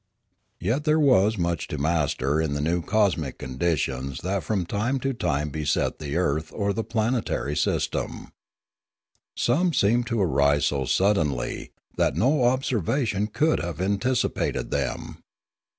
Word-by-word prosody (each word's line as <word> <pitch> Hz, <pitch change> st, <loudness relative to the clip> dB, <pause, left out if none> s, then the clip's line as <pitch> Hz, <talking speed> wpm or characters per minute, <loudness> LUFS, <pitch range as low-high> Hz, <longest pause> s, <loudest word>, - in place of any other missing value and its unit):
Yet 115 Hz, -, 0 dB
there 155 Hz, +1 st, +3 dB
was 110 Hz, -7 st, +4 dB
much 85 Hz, -2 st, -1 dB
to 75 Hz, -, -4 dB
master 75 Hz, -1 st, +1 dB
in 80 Hz, -3 st, -1 dB
the -, -, -1 dB
new 85 Hz, +4 st, 0 dB
cosmic 95 Hz, -, 0 dB
conditions 65 Hz, -2 st, -2 dB
that 95 Hz, +1 st, -1 dB
from 90 Hz, +3 st, -1 dB
time 120 Hz, +9 st, -1 dB
to 135 Hz, +1 st, -1 dB
time 75 Hz, -, -1 dB
beset 75 Hz, 0 st, -1 dB
the 75 Hz, 0 st, -4 dB
earth 80 Hz, -3 st, 0 dB
or 100 Hz, -1 st, 0 dB
the 115 Hz, -, -2 dB
planetary 110 Hz, -, -1 dB
system. 75 Hz, -, -2 dB, 1.1 s
Some 165 Hz, +8 st, +2 dB
seemed 120 Hz, 0 st, +2 dB
to 115 Hz, -1 st, -1 dB
arise 70 Hz, -5 st, +3 dB
so 70 Hz, -2 st, 0 dB
suddenly 75 Hz, -4 st, 0 dB, 0.3 s
that -, -, +2 dB
no 130 Hz, +2 st, +2 dB
observation 120 Hz, -, 0 dB
could 155 Hz, +8 st, +1 dB
have 85 Hz, -2 st, -4 dB
anticipated 100 Hz, +7 st, 0 dB
them. 65 Hz, -3 st, -3 dB
90 Hz, 135 wpm, -25 LUFS, 75-115 Hz, 1.1 s, was